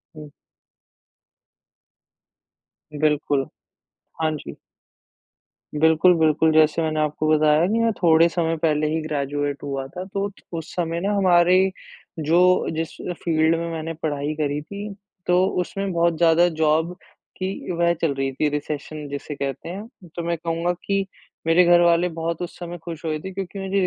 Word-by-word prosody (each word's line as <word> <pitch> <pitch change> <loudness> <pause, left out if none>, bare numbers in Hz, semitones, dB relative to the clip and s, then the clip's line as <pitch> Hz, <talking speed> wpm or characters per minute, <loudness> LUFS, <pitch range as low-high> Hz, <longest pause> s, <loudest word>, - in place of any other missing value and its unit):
हुँ। 150 -1 -10 2.7
बिल्कुल। 145 -3 +1 0.8
हाँ, 155 0 +2
जी। 145 - -8 1.3
बिल्कुल, 160 +3 +5
बिल्कुल, 160 0 +3
जैसे 155 +1 +4
मैंने 155 -1 -1
आपको 150 0 0
बताया 155 +1 +4
की 220 +4 +1
मैं 230 0 +3
थोड़े 165 -1 +6
समय 165 0 0
पहले 155 -1 +2
ही 160 - 0
ग्रेजुएट 145 -1 -2
हुआ 135 -2 -3
था, 180 +5 -7
तो 200 +1 -3 0.3
उस 160 - -7
समय 170 -1 -1
ना 200 +2 0
हमारे, 185 0 +4 0.5
जो 175 +4 +3
जिस 160 0 -2 0.3
फ़ील्ड 160 -1 +2
में 170 0 -3
मैंने 165 0 -4
पढ़ाई 145 -1 -1
करी 145 -1 -1
थी, 200 +6 -7 0.4
तो 180 +1 +4 0.2
उसमें 195 +2 -3
बहुत 170 -1 +2
ज़्यादा 170 +1 +5
जॉब 160 +3 +2 0.4
की 190 0 -4
वह 170 0 +2
चल 160 -4 +1
रही 135 0 -2
थी 150 +3 0
रिसेशन 150 +1 -5
जिसे 145 +1 -6
कहते 140 +2 -4
हैं। 195 -1 -10
तो 170 - -3
मैं 170 0 -1
कहूँगा 165 +2 -1
की 195 -1 0 0.4
मेरे 165 +2 +6
घर 175 0 +6
वाले 170 0 +4
बहुत 165 0 -2
उस 175 - -6
समय 175 0 -6
खुश 165 -1 -7
हुए 155 -1 -1
थे, 190 +5 -7
क्योंकि 195 +1 -5
मुझे 195 +1 -1
165 Hz, 155 wpm, -23 LUFS, 155-175 Hz, 2.7 s, थोड़े